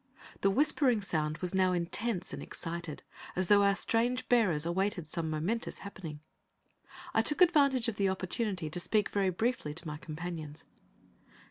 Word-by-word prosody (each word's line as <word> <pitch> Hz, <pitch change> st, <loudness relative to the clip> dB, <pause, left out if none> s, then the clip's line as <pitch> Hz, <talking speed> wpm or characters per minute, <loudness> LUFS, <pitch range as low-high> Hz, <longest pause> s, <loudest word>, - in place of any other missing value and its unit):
The 195 Hz, -, +3 dB
whispering 265 Hz, 0 st, +3 dB
sound 155 Hz, -5 st, -1 dB, 0.2 s
now 185 Hz, -1 st, +3 dB
was -, -, +1 dB
intense 180 Hz, +4 st, -2 dB
and -, -, -5 dB
excited, 165 Hz, -2 st, -6 dB, 0.3 s
as 185 Hz, -, +1 dB
though 205 Hz, +2 st, +5 dB
our 200 Hz, 0 st, +4 dB
strange 240 Hz, +5 st, 0 dB
bearers 185 Hz, -11 st, +3 dB
awaited 180 Hz, -1 st, -1 dB
some 160 Hz, 0 st, -3 dB
momentous 170 Hz, +10 st, -2 dB
happening. 165 Hz, -7 st, -8 dB, 0.9 s
I 225 Hz, -, +4 dB
took 295 Hz, +6 st, +3 dB
advantage 280 Hz, -9 st, +4 dB
of 225 Hz, -3 st, -2 dB
the 195 Hz, -1 st, +2 dB
opportunity 190 Hz, -1 st, -2 dB
to 155 Hz, +3 st, -3 dB
speak 210 Hz, +3 st, +1 dB
very 195 Hz, -2 st, +1 dB
briefly 185 Hz, -6 st, -1 dB
to 165 Hz, -, -6 dB
my 150 Hz, 0 st, -4 dB
companions. 155 Hz, -1 st, -7 dB
190 Hz, 155 wpm, -31 LUFS, 165-225 Hz, 0.9 s, though